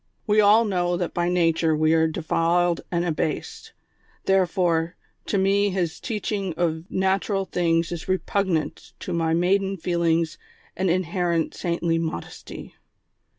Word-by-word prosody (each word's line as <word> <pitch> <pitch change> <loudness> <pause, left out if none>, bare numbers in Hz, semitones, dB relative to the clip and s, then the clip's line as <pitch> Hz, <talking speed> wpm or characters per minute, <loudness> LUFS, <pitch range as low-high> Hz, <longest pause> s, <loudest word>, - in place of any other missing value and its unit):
We 215 0 +4
all 210 +3 +5
know 175 -3 0
that 175 -1 -3
by 175 0 0
nature 165 -2 +2
we 155 +1 +3
are 160 0 +4
defiled 170 +1 +1
and 175 0 0
abased; 155 -2 -3 0.5
therefore, 175 -3 +1 0.3
to 200 - 0
me 200 +1 +3
his 175 -3 -2
teaching 205 -5 -3
of 165 0 -1
natural 195 +1 0
things 170 -2 0
is 170 -2 -5
repugnant 185 -3 -1
to 180 - -4
my 165 -1 +1
maiden 195 +3 +1
feelings 170 -2 0 0.4
and 190 0 0
inherent 175 -2 0
saintly 170 -1 -1
modesty." 160 - -6
175 Hz, 130 wpm, -24 LUFS, 165-190 Hz, 0.5 s, all